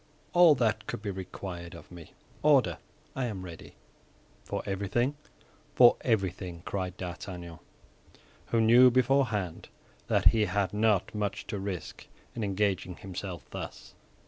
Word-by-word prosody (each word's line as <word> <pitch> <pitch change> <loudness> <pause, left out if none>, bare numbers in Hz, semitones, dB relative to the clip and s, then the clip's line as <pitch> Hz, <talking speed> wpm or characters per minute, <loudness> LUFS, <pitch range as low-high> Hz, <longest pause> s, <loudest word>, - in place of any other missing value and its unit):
"All 175 -3 +7
that 115 -4 0
could 105 - -5
be 100 - -2
required 90 -2 -7
of - - -13
me. 85 -2 -12 0.3
Order; 130 - +4 0.4
I 130 - -1
am 100 -6 -5
ready." 85 -2 -11 0.7
"For - - -4
everything?" 100 +7 0 0.6
"For 120 -1 +8
everything," 95 -6 -1
cried 95 -2 -3
D'Artagnan, 90 -2 -7 0.9
who 115 - +1
knew 120 +3 +7
beforehand 125 -8 +1 0.4
that - - +5
he 110 -2 +2
had 100 +1 -1
not 105 -2 +2
much 105 -2 -3
to 100 - -4
risk 95 -3 -6 0.3
in 115 - -3
engaging 100 -2 -1
himself 95 -1 -7
thus. - - -8
100 Hz, 130 wpm, -29 LUFS, 90-115 Hz, 0.9 s, For